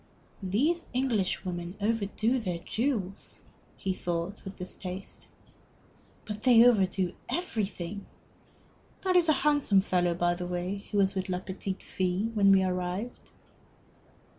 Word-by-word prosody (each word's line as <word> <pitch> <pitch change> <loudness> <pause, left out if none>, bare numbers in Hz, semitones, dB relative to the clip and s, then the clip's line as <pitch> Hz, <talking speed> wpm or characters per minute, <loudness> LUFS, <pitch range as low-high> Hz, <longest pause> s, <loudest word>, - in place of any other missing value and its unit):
"These 270 - +1
Englishwomen 185 -7 -1
overdo 225 +3 +1
their 180 -6 -2
jewels," 200 0 -3 0.4
he 190 - -1
thought, 175 +3 -3
with 195 0 -7
distaste. 185 +1 -6 1.0
"But 210 0 -5
they 240 -2 +7
overdo 190 -6 +3 0.2
everything. 205 - -3 0.9
That 370 -1 +1
is 345 -2 +5
a - - +7
handsome 290 -10 +4
fellow, 180 -2 +1
by 175 0 +2
the 175 0 -4
way, 180 +3 -3
who 205 - 0
was 195 -1 +3
with 190 -1 -3
la 180 - 0
petite 190 +1 -5
fée 185 +5 -1
when 200 -2 +5
we 190 -1 +6
arrived." 185 +5 -3
195 Hz, 125 wpm, -29 LUFS, 180-225 Hz, 1.0 s, they